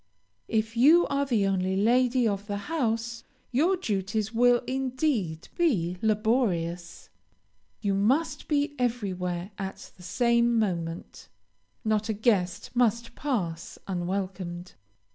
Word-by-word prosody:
If 225 +1 -1
you 305 +9 +6
are 280 0 0
the 225 -6 +2
only 190 -1 0
lady 245 +3 +3
of 200 -1 -2
the 205 -1 -2
house, 230 -3 -2 0.3
your 330 +10 +2
duties 210 - -2
will, 245 +1 +4
indeed, 255 - -1
be 185 - +1
laborious. 205 -6 0 0.7
You 200 -2 0
must 245 +12 +1
be 290 -1 +1
everywhere 190 -6 -2
at 195 0 -6
the - - -15
same 235 +5 +2
moment. 170 -5 -3 0.6
Not 215 0 +1
a - - +2
guest 200 -4 0
must 235 -1 +1
pass 185 - -3
unwelcomed. 180 -1 -4
220 Hz, 115 wpm, -27 LUFS, 190-245 Hz, 0.7 s, you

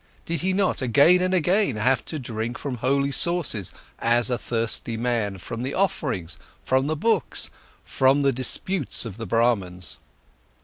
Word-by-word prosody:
Did 165 -1 -2
he 190 +2 +1
not, 190 -4 0
again 145 +8 +4
and 185 0 0
again, 185 - +1
have 125 +4 +1
to 155 - -3
drink 120 -2 -4
from 135 -4 -5
holy 140 +3 0
sources, 150 - +1 0.3
as 120 +2 +2
a 125 - +1
thirsty 115 0 -1
man, 115 -4 -1
from 115 +5 -7
the 130 +2 -3
offerings, 130 - -2 0.3
from 130 +1 +1
the 155 - -1
books, 205 - +1 0.3
from 135 +2 +2
the 140 - +3
disputes 130 +5 0
of 110 -3 -7
the 115 -2 -6
Brahmans? 95 -7 0
130 Hz, 160 wpm, -24 LUFS, 115-155 Hz, 0.3 s, again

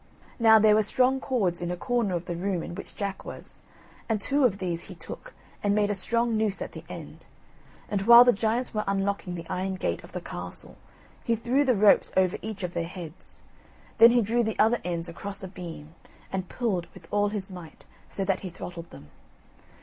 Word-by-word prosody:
Now, 220 -1 +7
there 215 0 +5
were 215 - +5
strong 255 +5 +2
cords 200 -11 -1
in 175 - -2
a 180 - -3
corner 230 -2 0
of 175 0 -4
the 175 - -4
room 180 -1 -2
in - - -7
which 200 - -8
Jack 200 -2 -4
was, - - -10 0.5
and 220 -2 +1
two 280 +6 +4
of 205 -5 +2
these 175 -3 -3
he - - -10
took, - - -9 0.3
and 205 0 +1
made 205 -1 +2
a - - +1
strong 230 +4 0
noose 215 -3 +1
at - - -5
the - - -9
end; - - -10 0.6
and 200 -2 -1
while 235 +4 +9
the 245 0 +5
giants 230 +5 -1
were 210 -1 -1
unlocking 195 -2 -1
the 165 -1 -7
iron 190 +1 -2
gate 85 - -2
of - - -13
the - - -4
castle 90 0 -6 0.5
he 230 - +1
threw 240 +5 +1
the 255 -3 +3
ropes 205 0 +5
over 185 -1 +2
each 215 -2 -6
of 180 -1 -3
their 170 - -2
heads. 175 -2 -10 0.6
Then 230 +1 +10
he 240 -1 +3
drew 235 +3 +1
the 220 -1 -2
other 230 +2 +3
ends 170 -1 -2
across 195 +4 -5
a - - -4
beam, 170 -4 -9 0.4
and 190 -1 -3
pulled 200 -8 -2
with - - -14
all 205 0 +2
his 200 -2 -4
might, 175 -4 -11 0.2
so 195 - -3
that 190 -1 +1
he 190 - -6
throttled 170 -1 -8
them. 75 - -14
200 Hz, 210 wpm, -27 LUFS, 180-225 Hz, 0.6 s, Then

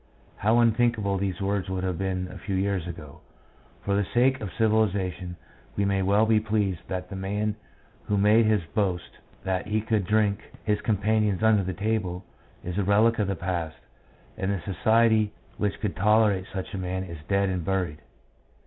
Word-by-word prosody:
How 110 +3 +3
unthinkable 115 -4 +2
these 95 -1 -2
words 100 -1 -1
would 95 -1 -2
have 90 -2 -2
been 95 -1 -2
a - - -9
few 100 - -3
years 95 -2 0
ago. 80 -5 -9 0.6
For 100 - +1
the 100 - +2
sake 130 +2 +3
of 100 -4 -4
civilisation 100 -5 +1 0.4
we 100 - +1
may 100 -1 +1
well 100 +3 +3
be 110 -1 +4
pleased 105 -5 0
that 90 -1 -4
the - - -4
man 105 +2 -2 0.5
who 105 - 0
made 105 +3 +5
his 105 -4 +2
boast 95 -5 -2 0.2
that 95 +1 -2
he 105 +1 +1
could 110 -3 -1
"drink 105 -1 +2 0.2
his 105 -1 0
companions 105 -1 +1
under 110 -2 +5
the 95 0 -3
table," 100 -3 -2 0.4
is 90 +3 -3
a - - +2
relic 110 +4 +3
of 105 - +1
the 100 - -1
past, 85 -2 -3 0.6
and 95 +1 -1
the 100 -3 -2
society 110 +3 +2 0.2
which 105 -1 -1
could 105 -3 -2
tolerate 105 -1 +3
such 95 +2 -5
a 100 - -3
man 95 0 -3
is 85 -4 -8
dead 100 0 +2
and 90 -2 -2
buried. 90 -4 -2
100 Hz, 180 wpm, -26 LUFS, 95-110 Hz, 0.6 s, made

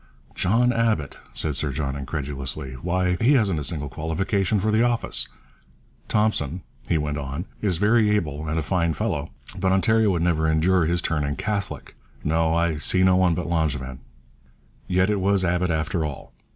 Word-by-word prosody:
'John 120 +6 +2
Abbott,' 110 -11 0
said 75 -3 -1
Sir 70 0 -1
John 70 0 -3
incredulously. 70 -1 -4
'Why, 90 +6 0
he 125 +6 +5
hasn't 100 - +2
a - - -4
single 75 -1 -2
qualification 95 - -1
for 110 +3 0
the 110 +1 +3
office. 120 -1 +1 0.8
Thompson,' 95 -6 0 0.3
he 85 - +3
went 75 -1 -2
on, 70 +5 -5 0.2
'is 95 -5 +1
very 105 +3 +3
able 80 -7 -1
and 80 +2 -1
a 80 - 0
fine 85 0 0
fellow, 75 +1 -2 0.3
but 95 - +1
Ontario 110 +3 +3
would 85 -3 +1
never 80 -2 +1
endure 85 +2 +3
his 85 0 0
turning 75 -2 -1
Catholic. 100 +1 -3 0.3
No, 80 +1 +1
I 85 -2 +1
see 90 +5 +2
no 95 0 +5
one 90 -2 +3
but 90 - -3
Langevin.' 75 -6 -1 0.9
Yet 95 +3 +2
it 105 - 0
was 100 -1 +2
Abbott 90 +1 +1
after 80 +1 -1
all. 75 -3 -6
85 Hz, 170 wpm, -24 LUFS, 75-95 Hz, 0.9 s, he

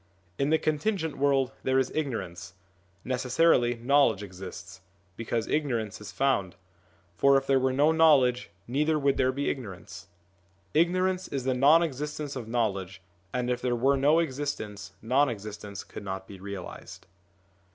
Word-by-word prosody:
In 140 - +1
the 160 - +4
contingent 155 +1 -1
world 135 -2 +2
there 130 0 +1
is 130 -1 +1
ignorance; 105 - -4 0.5
necessarily 125 0 +2
knowledge 125 -3 +2
exists, 95 -1 -9 0.3
because 115 0 -2
ignorance 120 -10 -2
is 100 -1 -8
found; 100 -5 0 0.6
for 140 +10 +4
if 135 - -1
there 135 -1 +3
were 130 0 +1
no 145 +4 +3
knowledge, 140 - +4 0.2
neither 150 +5 +1
would 140 -2 +1
there 130 0 +2
be 140 +2 -3
ignorance. 95 -7 -6 0.7
Ignorance 185 +3 +1
is 135 -2 -4
the 130 0 +1
non 145 +6 +5
existence 150 -1 -4
of 120 -4 -6
knowledge, 100 -5 -2 0.3
and 125 -1 -2
if 125 0 -1
there 125 -1 0
were 135 +4 +3
no 145 +4 +3
existence, 135 -10 -3
non 130 +5 +3
existence 105 -2 -7
could - - -10
not 95 -1 -5
be 95 - -11
realised. 100 -2 -8
130 Hz, 150 wpm, -28 LUFS, 105-145 Hz, 0.7 s, non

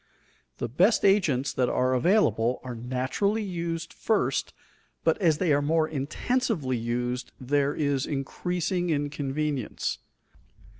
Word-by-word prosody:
The - - -2
best 180 - +3
agents 150 -10 +3
that 125 -2 +1
are 130 0 +1
available 125 - +2
are 125 -1 -5
naturally 130 - -1
used 170 -3 -4
first, 220 - 0 0.5
but - - +3
as 160 -5 +4
they 165 -2 +2
are 145 - +3
more 155 +2 +2
intensively 155 - -1
used 120 +2 -2
there 140 +2 +1
is 140 -3 0
increasing 175 +5 -2
inconvenience. 145 -3 -2
145 Hz, 115 wpm, -27 LUFS, 130-175 Hz, 0.5 s, as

